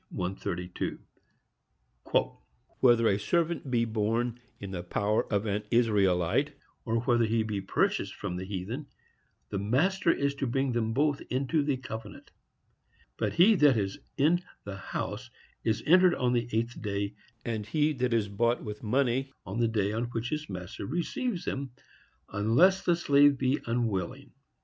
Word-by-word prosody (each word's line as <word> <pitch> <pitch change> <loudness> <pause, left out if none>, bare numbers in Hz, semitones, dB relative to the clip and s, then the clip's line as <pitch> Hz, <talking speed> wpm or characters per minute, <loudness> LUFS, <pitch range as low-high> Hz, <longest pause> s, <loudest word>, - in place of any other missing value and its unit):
132. 90 -1 -4 1.8
Whether 120 -3 +5
a 100 -1 +2
servant 170 - 0
be 120 -2 +2
born 115 +2 -1 0.2
in 100 -1 -7
the 90 -2 -4
power 100 +4 0
of 100 0 +1
an 105 0 -1
Israelite, 100 -7 +2 0.3
or 115 0 0
whether 120 -1 +3
he 110 0 +1
be 105 -2 -3
purchased - - 0
from 90 - -4
the 90 - -4
heathen, 100 +9 -5 0.6
the 100 - -2
master 170 - +2
is 140 -2 0
to 140 -1 -3
bring 135 +2 0
them 115 -2 0
both 145 +3 +1
into 135 +5 +1
the 140 -2 0
covenant. 110 -5 -8 0.9
But - - -1
he 185 +6 +6
that 145 -6 +5
is 100 -2 -2 0.2
in 165 +5 +3 0.2
the 100 -1 -6
house 105 +5 -5 0.3
is 110 -1 0
entered 180 +2 +6
on 125 -1 +1
the 120 -1 0
eighth 115 +2 -2
day; 100 -1 -2 0.3
and 110 -3 -2
he 150 +5 +2
that 125 -2 -1
is 115 -3 +2
bought 115 +4 0
with 105 -1 -6
money, 130 +3 +1
on 100 +5 -4
the 115 - +3
day 105 -3 0
on 115 +3 -1
which 120 +1 -4
his 155 0 -3
master 90 0 -6
receives 175 - -2
him, 135 -2 -4 0.6
unless 125 - +4
the 175 - +2
slave 145 -3 +4
be 130 +1 +1
unwilling. 115 +2 -2
120 Hz, 155 wpm, -29 LUFS, 105-140 Hz, 1.8 s, he